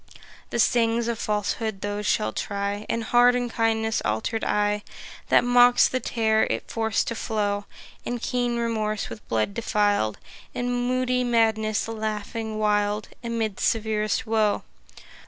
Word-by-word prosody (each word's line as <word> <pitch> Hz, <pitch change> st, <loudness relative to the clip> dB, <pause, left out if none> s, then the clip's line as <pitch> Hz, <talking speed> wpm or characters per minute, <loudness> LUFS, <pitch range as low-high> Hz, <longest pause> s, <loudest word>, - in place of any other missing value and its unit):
The -, -, -3 dB
stings 235 Hz, 0 st, +2 dB
of 235 Hz, -2 st, -2 dB
Falsehood 210 Hz, 0 st, -2 dB
those 205 Hz, 0 st, -3 dB
shall 215 Hz, -, +1 dB
try, 200 Hz, +1 st, -3 dB
And 230 Hz, -, -1 dB
hard 245 Hz, +2 st, +5 dB
Unkindness' 225 Hz, -2 st, 0 dB
alter'd 110 Hz, -, -1 dB
eye, 210 Hz, 0 st, +1 dB, 0.5 s
That -, -, +5 dB
mocks 245 Hz, 0 st, +6 dB
the 255 Hz, -, -1 dB
tear 220 Hz, -3 st, +1 dB
if -, -, -1 dB
forc'd 225 Hz, -2 st, -1 dB
to -, -, -2 dB
flow; 205 Hz, -2 st, -2 dB, 0.4 s
And 245 Hz, 0 st, -3 dB
keen 245 Hz, 0 st, -1 dB
Remorse 215 Hz, -3 st, -1 dB
with 115 Hz, -1 st, -10 dB
blood 115 Hz, -, 0 dB
defil'd, 205 Hz, -, +1 dB, 0.4 s
And 245 Hz, 0 st, -1 dB
moody 255 Hz, 0 st, +1 dB
Madness 220 Hz, -3 st, +1 dB
laughing 220 Hz, 0 st, -4 dB
wild 210 Hz, 0 st, 0 dB
Amid 225 Hz, -4 st, -2 dB
severest 215 Hz, +1 st, 0 dB
woe. 215 Hz, -2 st, +1 dB
220 Hz, 135 wpm, -25 LUFS, 210-235 Hz, 0.5 s, mocks